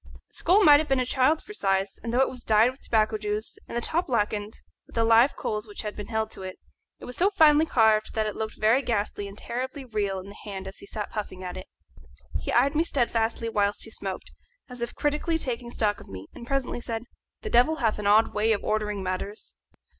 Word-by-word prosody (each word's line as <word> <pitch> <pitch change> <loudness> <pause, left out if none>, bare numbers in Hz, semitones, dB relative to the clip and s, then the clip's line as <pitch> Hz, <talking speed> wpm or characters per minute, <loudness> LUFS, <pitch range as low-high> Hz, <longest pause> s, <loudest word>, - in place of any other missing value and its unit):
The - - -36
skull 390 +5 +4
might 290 -4 +8
have 310 - -3
been 270 -1 +3
a 255 - +1
child's 265 +5 +2
for 420 - -10
size, 195 - 0
and 230 - -4
though 245 +2 +3
it 265 - +4
was 250 -2 -7
dyed 220 +3 +4
with 260 - -18
tobacco 215 -1 +1
juice 210 +1 -3
and - - -4
the - - 0
top 335 +8 0
blackened, 210 -3 -1 0.3
with - - -17
the 230 - +3
live 230 +4 +5
coals 210 0 -3
which 205 - -7
had 210 -1 -5
been 205 -1 -7
held 220 -1 -1
to - - -7
it, 185 -1 -7 0.4
it - - -11
was 250 - -6
so 380 +3 +3
finely 315 -5 +5
carved 220 -4 +3
that 220 -1 +1
it 210 - -3
looked 220 0 -5
very 225 +5 +4
ghastly 205 -4 -2
and 200 +1 -11
terribly 260 +4 -5
real 205 -5 -1
in 185 - -9
his 200 - -12
hand 195 -2 -6
as 190 - -8
he - - -11
sat 210 -1 -5
puffing 200 -3 -5
at 180 -1 -5
it. 185 0 -8 0.7
He - - -4
eyed 270 +4 +3
me 315 +2 +3
steadfastly 230 -6 0
whilst 205 -2 0
he 225 - -6
smoked, 195 -3 -5 0.4
as 250 -2 -8
if 235 - -3
critically 300 +3 0
taking 245 -5 -3
stock 210 -3 0
of - - -14
me, 95 0 -8
and 235 - -10
presently 270 -3 -1
said, 225 -1 -4 0.4
"The 430 - -4
devil 305 +4 +5
hath 225 -8 0
an 205 - -1
odd 215 +2 +5
way 220 +2 +2
of 205 - -3
ordering 210 -2 -1
matters. 185 - -5
225 Hz, 235 wpm, -26 LUFS, 210-255 Hz, 0.7 s, might